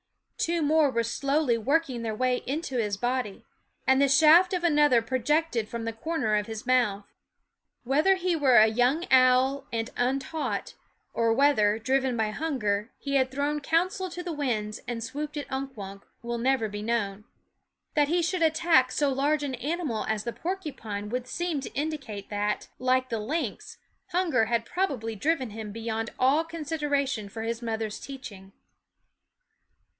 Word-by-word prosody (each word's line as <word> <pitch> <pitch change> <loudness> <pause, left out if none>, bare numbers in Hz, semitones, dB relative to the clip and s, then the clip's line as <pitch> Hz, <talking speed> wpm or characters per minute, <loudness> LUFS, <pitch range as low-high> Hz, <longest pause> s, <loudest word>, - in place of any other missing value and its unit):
Two 335 -1 0
more 305 0 +4
were 235 -3 0
slowly 275 +2 +1
working 275 0 0
their 220 -2 -3
way 255 +2 +1
into 275 -1 -2
his 210 -4 -1
body; 245 -2 -2 0.4
and 265 +1 +4
the 280 - +5
shaft 320 +6 +6
of 360 -2 -1
another 295 -6 +4
projected 255 +1 0
from 235 -1 -5
the 230 - -3
corner 265 -1 -2
of 210 0 0
his 220 -1 -6
mouth. 235 -6 +2 0.8
Whether 300 +10 +3
he 365 -2 0
were 275 -5 +3
a 215 - +9
young 245 +9 +2
owl 260 +1 +4
and 230 -1 -2
untaught, 270 +5 -2 0.4
or 230 -1 +2
whether, 225 -5 +3
driven 260 +2 0
by 220 -1 0
hunger, 215 -7 -1
he 280 - -5
had 260 -1 +2
thrown 285 +3 -1
counsel 365 +5 0
to 355 +1 -6
the 350 -2 -4
winds 225 -7 -2
and 230 -2 -3
swooped 295 +5 -5
at 290 - -3
Unk 265 -1 -4
Wunk, 195 -1 -8 0.2
will 235 0 -3
never 255 -2 +1
be 205 0 -6
known. 210 -3 -2 0.7
That 295 -2 +3
he 345 +3 +1
should 355 +1 -1
attack 320 -5 +3
so 285 -1 +1
large 290 +3 +1
an 275 -2 -3
animal 275 -2 -2
as 220 -1 -1
the 235 - -4
porcupine 280 - -5
would 250 +2 -3
seem 345 -1 -2
to - - -8
indicate 275 -10 -4
that, 205 0 -2
like 255 0 +1
the 225 -2 -2
lynx, 295 +11 -4 0.3
hunger 340 -10 +1
had 230 0 0
probably 265 - -2
driven 265 0 0
him 215 -1 -7
beyond 225 +1 -3
all 275 +5 +3
consideration 290 -8 -2
for 220 +2 -6
his 230 +1 -3
mother's 220 -2 -3
teaching. 205 -8 -9
260 Hz, 165 wpm, -27 LUFS, 225-300 Hz, 0.8 s, a